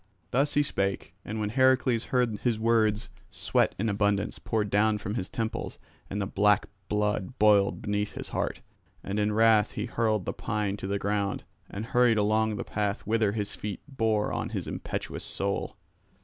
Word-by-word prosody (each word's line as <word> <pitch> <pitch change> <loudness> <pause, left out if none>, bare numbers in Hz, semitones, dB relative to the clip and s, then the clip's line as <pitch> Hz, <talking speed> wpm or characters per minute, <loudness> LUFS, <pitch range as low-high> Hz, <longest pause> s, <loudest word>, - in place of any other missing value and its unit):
Thus 140 +4 +1
he 145 - +4
spake; 100 -6 -2
and 110 +1 -4
when 105 -1 -1
Heracles 130 -1 +3
heard 120 -5 +1
his 120 -3 +1
words, 110 -1 +2 0.2
sweat - - +1
in 110 - -1
abundance 100 -1 0
poured 105 -3 -1
down 105 +1 +3
from 105 0 -4
his 95 -5 -3
temples 115 0 -3 0.3
and 100 - -3
the 100 - 0
black 105 +1 +3 0.2
blood 105 +2 -1
boiled 105 -2 +4
beneath 105 0 -1
his - - -7
heart. - - -2 0.4
And 100 +2 -2
in 105 0 +2
wrath 110 -1 +4
he 105 - -3
hurled 110 -4 0
the - - -2
pine 105 -1 -2
to 95 - -5
the 100 +1 0
ground 100 0 -1 0.3
and 105 +3 -5
hurried 125 -2 +3
along 110 +1 +2
the - - -3
path 100 -1 -2
whither 110 -1 +2
his 105 -2 -2
feet 105 -2 -5
bore 110 -6 0
on - - -2
his - - -4
impetuous - - -5
soul. 100 0 -3
105 Hz, 175 wpm, -28 LUFS, 105-115 Hz, 0.4 s, he